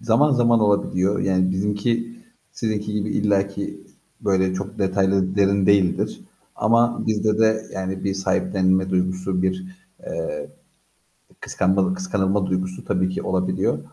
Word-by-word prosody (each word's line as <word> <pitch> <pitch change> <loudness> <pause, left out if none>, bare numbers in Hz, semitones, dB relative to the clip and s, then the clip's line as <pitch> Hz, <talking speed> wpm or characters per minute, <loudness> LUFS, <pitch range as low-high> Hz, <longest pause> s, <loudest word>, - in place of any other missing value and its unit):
Zaman 140 +6 +3
zaman 120 -2 +3
olabiliyor. 100 -1 +1
Yani, 95 -1 +1
bizimki 105 - -1 0.4
sizinki 105 -2 -3
gibi 105 0 -2
illa 100 -1 +1
ki 100 0 -6 0.4
böyle 95 -2 +1
çok 100 +1 -6
detaylı 95 -1 +1
derin 100 -1 +3
değildir, 100 -3 +2 0.4
ama 115 +2 +2
bizde 110 0 +1
de, 110 0 +3
yani, 95 0 -4
bir 95 - 0
sahiplenme 95 - +1
duygusu, 90 0 -1
bir, 185 - -1 0.4
eee, - - -4 0.9
kıskanmalı 95 - +1
kıskanılma 100 - 0
duygusu 95 0 -3
tabii 90 -1 0
ki 95 - -4
olabiliyor 95 0 0
100 Hz, 125 wpm, -22 LUFS, 95-110 Hz, 0.9 s, Zaman